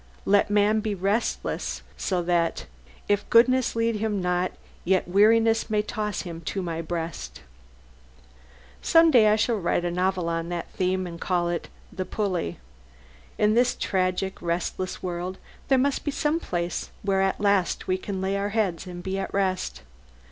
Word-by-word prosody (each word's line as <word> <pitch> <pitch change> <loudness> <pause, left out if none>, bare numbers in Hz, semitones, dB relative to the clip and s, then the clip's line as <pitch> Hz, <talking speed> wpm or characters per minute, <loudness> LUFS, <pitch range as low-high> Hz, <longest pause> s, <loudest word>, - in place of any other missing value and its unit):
Let 200 0 +4
man 210 +1 +3
be 215 -1 -2
restless, 200 +5 -1
so 180 -3 -1
that 170 -1 0 0.4
"If 205 0 0
goodness 255 +2 +4
lead 230 -1 +1
him 210 -1 -1
not, 180 0 0 0.3
yet 185 -1 +2
weariness 225 +4 +4
May 210 -1 +1
toss 210 -1 -3
him 170 -3 -7
to 190 +4 -3
My 165 -2 -3
breast." 160 - -5 1.4
Some 330 0 +5
day 235 -6 +6
I 210 - +5
shall 225 +1 +1
write 175 -1 0
a 175 - 0
novel 180 0 0
on 165 0 -2
that 175 -1 -4
theme, 185 0 0
and 170 -1 -8
call 175 -2 0
it 175 - -3 0.2
"The 185 - -3
Pulley." 185 - -2 0.8
In 210 0 +3
this 245 +2 +3
tragic, 185 0 -1
restless 175 +2 -3
world 180 +1 -3 0.3
there 265 - +4
must 275 +2 +1
be - - -1
some 295 +3 0
place 175 - -3
where 195 -1 +2
at 195 0 +1
last 200 -3 +1
we 185 0 +1
can 190 -1 -4
lay 190 +1 0
our 200 +1 -1
heads 200 -5 -1
and 175 -1 -7
be 190 0 -2
at 195 - -4
rest. 185 - -1
190 Hz, 165 wpm, -25 LUFS, 175-215 Hz, 1.4 s, day